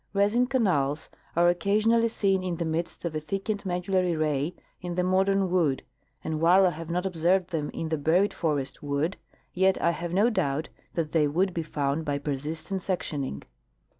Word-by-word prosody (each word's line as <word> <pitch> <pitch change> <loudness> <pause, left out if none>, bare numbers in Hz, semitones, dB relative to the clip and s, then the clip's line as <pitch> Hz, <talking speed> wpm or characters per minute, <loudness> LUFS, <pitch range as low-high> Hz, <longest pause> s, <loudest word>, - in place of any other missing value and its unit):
Resin 210 +5 +3
canals 160 - +1 0.3
are 170 +1 +4
occasionally 215 +6 +3
seen 195 -4 +1
in 180 -2 -2
the 170 - -2
midst 165 +2 -3
of 170 - -2
a 155 - -1
thickened 195 +5 -3
medullary 180 0 0
ray 155 +1 0 0.3
in 175 -1 -4
the 180 - +1
modern 190 0 +2
wood, 160 -7 +1 0.4
and 155 -1 -3
while 180 +3 +6
I 180 - +3
have 165 0 -8
not 180 +2 -1
observed 180 +1 +1
them 155 -3 -2
in 160 - -4
the 160 -2 -1
buried 175 +7 +2
forest 145 -5 -2
wood, 145 +6 -1 0.4
yet 190 +1 +3
I 170 - +3
have 170 +1 -5
no 205 +7 +3
doubt 145 -6 -1 0.3
that 160 -3 -1
they 155 -3 +3
would 180 +6 +1
be 170 - -1
found 145 -1 -1
by 145 -2 -1
persistent 155 +6 -4
sectioning. 145 - -3
170 Hz, 180 wpm, -27 LUFS, 155-190 Hz, 0.4 s, while